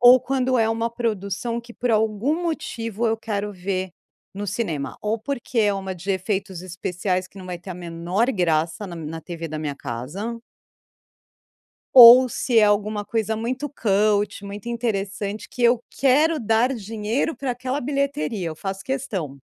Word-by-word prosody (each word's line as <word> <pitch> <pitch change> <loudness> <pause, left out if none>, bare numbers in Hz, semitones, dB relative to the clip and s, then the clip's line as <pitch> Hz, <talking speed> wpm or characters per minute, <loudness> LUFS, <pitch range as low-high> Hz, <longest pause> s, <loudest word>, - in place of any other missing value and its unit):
ou 250 +1 +8
quando 255 0 +1
é 225 -1 +3
uma 230 +1 0
produção 230 0 -2
que 235 0 -13
por 245 - -1
algum 220 - +1
motivo 235 - -2
eu 225 0 +1
quero 210 -2 -3
ver 185 0 -3 0.4
no 205 +1 -4
cinema, 180 -9 -3
ou 215 +2 -1
porque 250 0 -4
é 210 -2 +4
uma 190 -1 -4
de 185 +3 -5
efeitos 190 -1 -2
especiais 185 +1 -2
que 195 - -14
não 185 - -9
vai 180 -1 -5
ter 175 +2 -10
a - - -4
menor 175 +5 -1
graça 170 0 0
na 175 - -7
na 160 0 -6
TV 165 +1 -6
da 155 0 -5
minha 150 -2 -3
casa. 170 - -5 1.6
Ou 250 0 +11
se 240 -1 +2
é - - +6
alguma 205 0 +2
coisa 220 -1 -1
muito 255 +6 -3
cult, 205 -4 +1
muito 200 +2 -8
interessante 205 -3 -3
que 245 - -4
eu 240 0 +4
quero 300 +4 +3
dar 225 +3 +2
dinheiro 225 +7 -2
pra 270 -2 -2
aquela 255 +3 -3
bilheteria. 275 - -1
Eu 155 - -7
faço 195 +3 -5
questão. 200 - -3
215 Hz, 165 wpm, -23 LUFS, 190-240 Hz, 1.6 s, Ou